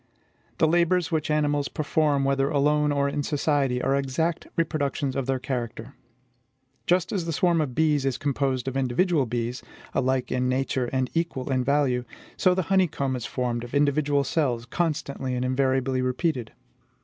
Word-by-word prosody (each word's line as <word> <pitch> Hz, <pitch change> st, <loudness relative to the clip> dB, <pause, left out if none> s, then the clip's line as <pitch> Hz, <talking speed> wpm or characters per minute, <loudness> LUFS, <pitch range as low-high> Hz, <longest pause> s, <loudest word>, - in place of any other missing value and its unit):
The 160 Hz, -, +4 dB
labors 170 Hz, 0 st, +2 dB
which 155 Hz, -1 st, -1 dB
animals 145 Hz, -1 st, +1 dB
perform, 150 Hz, -2 st, +1 dB
whether 135 Hz, 0 st, +1 dB
alone 150 Hz, +1 st, +2 dB
or 140 Hz, -1 st, +1 dB
in 145 Hz, +1 st, -1 dB
society, 140 Hz, -3 st, 0 dB
are 135 Hz, -, +2 dB
exact 140 Hz, +5 st, -1 dB
reproductions 145 Hz, -4 st, -1 dB
of 135 Hz, -2 st, -2 dB
their 135 Hz, 0 st, +1 dB
character. 125 Hz, -1 st, -5 dB, 0.9 s
Just 180 Hz, 0 st, +2 dB
as 190 Hz, -5 st, -1 dB
the 165 Hz, -, -2 dB
swarm 170 Hz, +1 st, +2 dB
of 130 Hz, -5 st, -3 dB
bees 150 Hz, -3 st, +2 dB
is 135 Hz, -2 st, 0 dB
composed 135 Hz, -2 st, -1 dB
of 130 Hz, -, -3 dB
individual 135 Hz, +3 st, +1 dB
bees, 120 Hz, +2 st, -3 dB, 0.3 s
alike 130 Hz, -1 st, 0 dB
in 125 Hz, 0 st, 0 dB
nature 130 Hz, 0 st, 0 dB
and 130 Hz, -1 st, -1 dB
equal 165 Hz, -5 st, -2 dB
in 130 Hz, -1 st, +1 dB
value, 135 Hz, -2 st, +1 dB, 0.3 s
so 180 Hz, -1 st, +3 dB
the 185 Hz, -, 0 dB
honeycomb 145 Hz, -8 st, +1 dB
is 125 Hz, -2 st, -4 dB
formed 120 Hz, -2 st, -2 dB
of 120 Hz, +3 st, -7 dB
individual 145 Hz, 0 st, +2 dB
cells, 125 Hz, -5 st, 0 dB
constantly 140 Hz, -4 st, -2 dB
and 125 Hz, +1 st, -1 dB
invariably 130 Hz, 0 st, +1 dB
repeated. 130 Hz, -1 st, -1 dB
140 Hz, 160 wpm, -25 LUFS, 130-155 Hz, 0.9 s, The